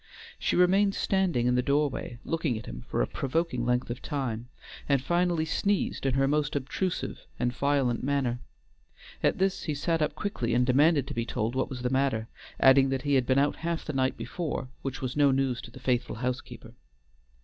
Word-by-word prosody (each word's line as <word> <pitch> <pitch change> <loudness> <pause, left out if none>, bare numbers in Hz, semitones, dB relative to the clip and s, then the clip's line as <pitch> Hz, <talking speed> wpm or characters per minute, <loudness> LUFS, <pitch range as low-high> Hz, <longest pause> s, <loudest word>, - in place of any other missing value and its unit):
She - - 0
remained 195 +3 +4
standing 185 -11 +1
in 125 - +3
the 125 - +3
doorway, 140 -3 0
looking 160 -8 -1
at 110 - -8
him - - -7
for - - +1
a - - -1
provoking 135 -3 -1
length 125 0 +1
of 120 - -6
time, 125 -6 -3 0.4
and 140 -1 +4
finally 175 +3 +1
sneezed 195 -2 0
in 130 - +1
her 135 0 +3
most 150 0 0
obtrusive 150 +7 -3
and 120 0 0
violent 135 -3 +1
manner. 130 -3 0 0.8
At - - +2
this 190 0 +1
he 150 - -1
sat 165 +3 0
up 150 - 0
quickly 125 - -2
and 125 0 +3
demanded 140 +3 +4
to 140 - -6
be 115 - -1
told 115 0 -2
what 130 0 -1
was 125 -2 -6
the 125 - 0
matter, 130 -4 +1 0.3
adding 135 0 +6
that 135 0 -1
he 145 -1 0
had 130 -3 +3
been 130 - +3
out 145 +1 +2
half 170 0 -3
the 155 - -4
night 130 0 +1
before, 155 -6 -4
which 135 -1 -5
was 130 -1 -3
no 145 -1 +5
news 130 -2 +1
to - - -10
the - - -12
faithful 125 -1 0
housekeeper. 125 +2 -5
135 Hz, 200 wpm, -28 LUFS, 125-155 Hz, 0.8 s, adding